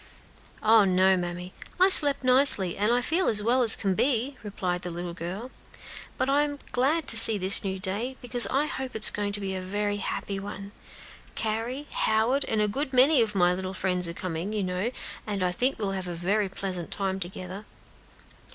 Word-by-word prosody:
"Oh, 220 0 +5
no, 190 0 +2
mammy! 180 0 -6 0.3
I 370 +1 +5
slept 290 -7 +8
nicely, 255 -8 +5
and 235 +5 0
feel 350 +4 0
as 210 -1 +2
well 245 +4 +1
as 225 -3 +8
can 195 -2 -2
be," 260 +5 -1
replied 185 -4 -5
the 180 - -6
little 175 0 -7
girl; 185 +9 -7 0.7
"but - - -1
I 280 +2 +2
am 290 -1 -3
glad 290 +6 0
to 230 - +8
see 225 -1 +3
this 190 0 +2
new 190 -1 -4
day, 205 +8 -2
because 245 0 -1
I 280 +3 -1
hope 265 -3 -7
it 220 - -2
is - - +7
going 205 -1 -4
to 205 - -3
be 195 -1 -5
a 185 - -5
very 205 +2 -3
happy 200 0 -5
one. 200 0 -9 0.6
Carry 230 +6 -4
Howard, 230 +6 0
and 215 -1 -1
a - - 0
good 265 +6 -4
many 260 +2 +4
of 215 -3 -2
my 180 -1 +2
little 185 +1 -6
friends 180 -2 -1
are 170 - -6
coming, 180 +3 -6
you 210 -2 -2
know, 185 +4 -3 0.4
and 200 -3 -3
I 180 - 0
think 255 +9 -1
we 215 - -4
will 195 - -2
have 190 -1 -6
a 175 - -6
very 195 +4 -1
pleasant 185 -3 -6
time 195 -1 -3
together." 185 +2 -8
205 Hz, 205 wpm, -25 LUFS, 185-245 Hz, 0.7 s, slept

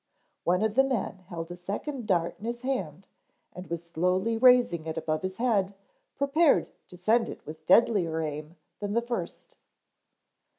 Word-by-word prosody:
One 180 +4 +2
of 220 -1 +1
the 270 - +5
men 235 -7 -2
held 165 -1 -6
a - - -5
second 210 +8 -5
dart 170 -4 0
in 210 - -8
his 235 +1 -4
hand 195 - -3 0.5
and 180 +1 -9
was 170 0 -4
slowly 180 +6 0
raising 240 -9 +4
it 160 - -4
above 155 -1 -1
his 190 0 -4
head 205 -5 +1 0.4
prepared 285 +3 +3 0.2
to 180 - -12
send 220 +6 +2
it - - -9
with 155 +1 -10
deadlier 185 -6 +4
aim 150 +1 -5 0.2
than 205 -1 -3
the 235 +1 +1
first. 240 - -6
195 Hz, 165 wpm, -28 LUFS, 170-235 Hz, 0.5 s, the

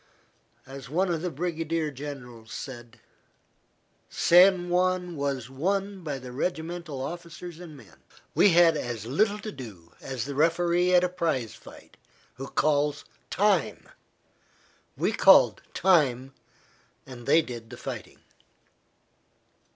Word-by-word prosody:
As 135 -1 -10
one 180 +5 +1
of 165 -2 -2
the 180 - -2
brigade 165 -1 -2
generals 125 -5 -9
said: 120 -3 -8 1.1
"San 180 +1 +5
Juan 180 0 0
was 140 -4 -2
won 195 +8 -2
by 145 -4 -3
the 125 -1 -9
regimental 160 +1 -4
officers 170 +2 -8
and 165 -4 -11
men. 110 -7 -17 0.4
We 205 - +5
had 170 -2 +5
as 120 -6 -4
little 205 - +1
to 215 +1 -7
do 100 - -11
as 130 -3 -4
the 140 - -5
referee 170 +4 +2
at 180 - +5
a - - +3
prize 160 - -2
fight - - -15 0.4
who 135 +1 -6
calls 150 -1 0 0.2
'time.' - - 0 1.1
We - - +1
called - - +5
'time' 135 -8 +2 0.7
and 120 -2 -11
they 160 - +5
did 120 -4 -9
the - - -10
fighting." - - -8
155 Hz, 125 wpm, -27 LUFS, 130-175 Hz, 1.1 s, San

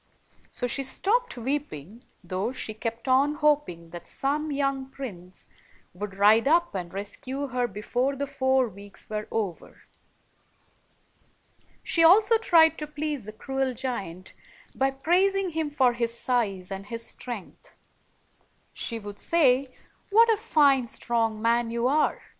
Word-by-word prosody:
So 245 - -3
she 245 +3 -1
stopped 415 - 0
weep 280 +5 -2
ing, 180 - -10 0.2
though 185 +6 -2
she 225 -4 -4
kept 230 +3 -5
on 275 +3 +3
hoping 290 - 0
that 175 0 -8
some 295 +3 -1
young 275 -1 -1
prince 185 -10 -9 0.5
would 195 +2 -6
ride 215 +5 +5
up 340 +3 +3
and 180 -3 -5
rescue 255 +8 -5
her 250 0 0
before 240 +6 -2
the 280 +1 -2
four 260 -1 +1
weeks 200 0 -10
were 210 0 -3
over. 200 -6 -4 2.0
She 330 - +2
also 420 +7 +6
tried 330 -7 +5
to 300 - -4
please 300 -5 -4
the 215 - -7
cruel 265 +3 -3
giant 195 -8 -5 0.4
by 270 0 +1
praising 365 +7 +1
him 320 -1 -2
for 260 -4 +3
his 235 0 -1
size 200 -7 -1
and 195 +1 -6
his 230 0 -4
strength. 240 -7 -8 1.0
She 230 - -4
would 205 -2 -9
say, 270 -5 +2 0.4
"What 455 +2 +6
a - - -1
fine, 285 - +3
strong 225 -2 -1
man 230 +1 +1
you 235 +1 0
are! 300 +3 +1
255 Hz, 140 wpm, -26 LUFS, 215-295 Hz, 2.0 s, also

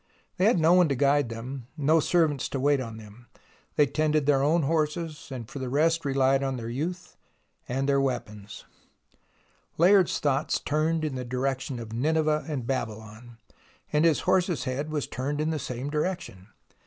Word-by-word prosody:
They 185 - +2
had 215 -4 +4
no 165 +2 +5
one 180 -3 +5
to 140 - +1
guide 140 -1 +2
them, 120 +2 -7
no 155 +2 +3
servants 155 -4 +1
to 135 - -3
wait 140 +1 +3
on 115 -3 -7
them. 110 +2 -14 0.5
They 150 - +5
tended 155 +1 0
their 140 -2 +3
own 155 +4 +2
horses, 155 +1 -1
and 120 -4 -6
for 140 - -8
the 130 -1 -4
rest 165 +5 +2
rehed 135 0 +2
on 135 -1 -2
their 115 -1 -5
youth 170 +9 -5 0.5
and 135 +2 -1
their 140 -1 +3
weapons, 110 -6 -4 1.1
Layard's 185 +2 +4
thoughts 145 0 0
turned 155 +2 0
in 150 - -3
the 130 -1 -4
direction 130 +1 -2
of 115 -1 -8
Nineveh 155 +4 +1
and 140 -6 -3
Babylon, 115 -2 -5 0.6
and 150 +1 +3
his 160 -6 +3
horse's 180 -4 +1
head 140 +3 -3
was 150 -2 -2
turned 140 +4 -3
in 155 +1 0
the 155 - -2
same 130 +1 -5
direction. 150 - -3
140 Hz, 175 wpm, -27 LUFS, 125-155 Hz, 1.1 s, no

